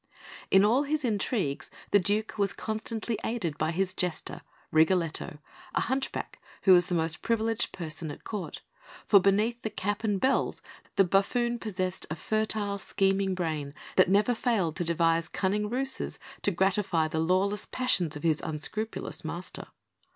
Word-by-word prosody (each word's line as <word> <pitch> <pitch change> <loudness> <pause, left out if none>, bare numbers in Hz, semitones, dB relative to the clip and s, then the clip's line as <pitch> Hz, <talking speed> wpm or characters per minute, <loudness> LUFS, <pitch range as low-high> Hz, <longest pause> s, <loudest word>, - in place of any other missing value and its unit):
In 190 +1 +6
all 240 +6 +4
his 295 0 -1
intrigues 205 - -1 0.2
the 205 - +6
Duke 210 +4 0
was 200 -2 +1
constantly 220 0 -3
aided 205 -10 -2
by 155 - +1
his 185 +2 0
Jester, 180 -3 -3 0.3
Rigoletto, 160 -1 +2 0.4
a - - +3
hunchback, 265 +2 -3 0.2
who 190 - +7
was 175 -1 +5
the 180 - -1
most 160 -1 0
privileged 225 -1 0
person 160 -2 -5
at - - -9
Court; 210 -4 -5 0.4
for, 200 - +7
beneath 210 +5 +2
the 220 - -2
cap 205 +1 -3
and 205 -3 +1
bells, 265 +5 +1 0.3
the 195 - +6
buffoon 235 +6 +1
possessed 185 -4 -3
a 155 - -3
fertile, 215 +2 -1
scheming 195 0 +1
brain 155 -5 -3 0.2
that 185 - +5
never 210 +5 +4
failed 215 -9 0
to - - 0
devise 165 0 +1
cunning 210 +2 0
ruses 265 +3 -1 0.2
to - - +3
gratify 190 -3 +1
the 160 0 -2
lawless 185 +5 +1
passions 185 - +1
of 150 - -7
his 160 -2 +2
unscrupulous 195 +8 -2
master. - - -6
195 Hz, 155 wpm, -28 LUFS, 170-220 Hz, 0.4 s, who